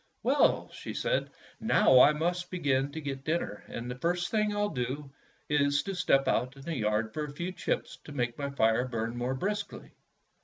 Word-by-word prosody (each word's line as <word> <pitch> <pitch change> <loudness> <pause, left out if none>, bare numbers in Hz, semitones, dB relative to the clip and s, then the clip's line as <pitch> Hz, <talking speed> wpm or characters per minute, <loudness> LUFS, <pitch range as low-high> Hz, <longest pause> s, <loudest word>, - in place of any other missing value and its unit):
''Well," - - +3
she - - -7
said, - - 0 0.3
"now 135 - +5
I 145 - +8
must 175 +3 -1
begin 140 -6 0
to 160 - -5
get 135 -2 -5
dinner, 155 -11 -2
and 115 - -6
the 125 - -7
first 175 +2 0
thing 215 -1 +2
I 205 - -3
'll 205 0 +1
do 135 0 -4 0.4
is 145 -1 +2
to 195 - -4
step 135 -6 +2
out 130 +1 +1
into 135 - -12
the 165 +4 -4
yard 110 -2 0
for 150 - -2
a 145 - -8
few 170 +6 -4
chips - - -3
to - - -9
make 120 -4 -1
my 140 -1 -3
fire 125 -2 +2
burn 115 -1 -3
more 125 +2 -1
briskly." 205 +7 -4
140 Hz, 200 wpm, -30 LUFS, 125-175 Hz, 0.4 s, I